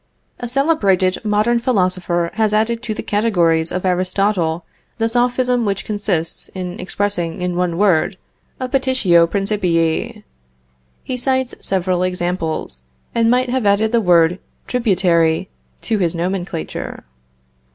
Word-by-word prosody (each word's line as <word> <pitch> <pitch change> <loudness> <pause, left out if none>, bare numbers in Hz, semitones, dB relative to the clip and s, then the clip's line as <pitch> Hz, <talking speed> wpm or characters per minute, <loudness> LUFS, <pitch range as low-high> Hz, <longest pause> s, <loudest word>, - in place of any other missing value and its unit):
A 245 - -4
celebrated 205 - +1
modern 215 +3 +2
Philosopher 185 -7 0
has 215 -1 +1
added 230 +2 +1
to 230 -3 -4
the - - -5
categories 170 -7 +1
of 185 +1 -3
Aristotle 180 -2 0 0.3
the 225 -1 +1
Sophism 245 +1 +1
which 195 -2 -2
consists 205 -6 -2
in 180 -1 -5
expressing 185 -3 -2
in 180 0 -2
one 175 -1 0
word 190 -1 +2 0.4
a 255 - -2
petitio 255 -11 +3
principii. 180 -5 0 0.8
He 255 - -4
cites 260 0 0
several 185 -1 -1
examples, 175 - -2 0.3
and 230 -1 +2
might 250 +1 +2
have 255 -5 0
added 210 +2 +3
the 235 -1 +3
word 175 -1 +4 0.3
tributary 185 -7 +1 0.3
to 220 -3 -1
his 175 -2 0
nomenclature. 175 0 -4
195 Hz, 125 wpm, -18 LUFS, 175-230 Hz, 0.8 s, word